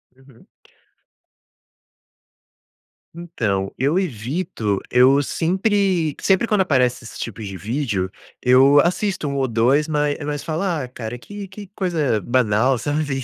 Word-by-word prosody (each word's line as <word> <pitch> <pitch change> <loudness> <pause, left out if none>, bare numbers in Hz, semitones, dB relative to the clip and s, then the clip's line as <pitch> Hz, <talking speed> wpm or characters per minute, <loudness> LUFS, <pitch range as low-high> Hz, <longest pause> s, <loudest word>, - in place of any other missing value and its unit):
Uhum. 130 -2 -21 2.7
Então 110 - -2
eu 145 +7 +1
evito, 125 - -2
eu 130 +3 +5
sempre 185 -1 0
sempre 195 +4 +2
quando 210 -3 +2
aparece 125 -9 +1
esses 115 - -10
tipos 110 -2 -6
de 95 -1 -7
vídeo, 105 -5 -2 0.3
eu 130 +3 +6
assisto 180 -2 -1
um 140 - -3
ou 135 -1 0
dois, 125 +7 +2
mas 150 -1 0
mas 145 -1 -3
falo 160 +3 -2
ah, 165 -9 -1
cara 120 -1 -7
que 200 +9 -9
que 200 +2 -10
coisa 155 - 0
banal, 125 +2 +2
sabe, 145 0 -2
140 Hz, 125 wpm, -21 LUFS, 120-170 Hz, 2.7 s, eu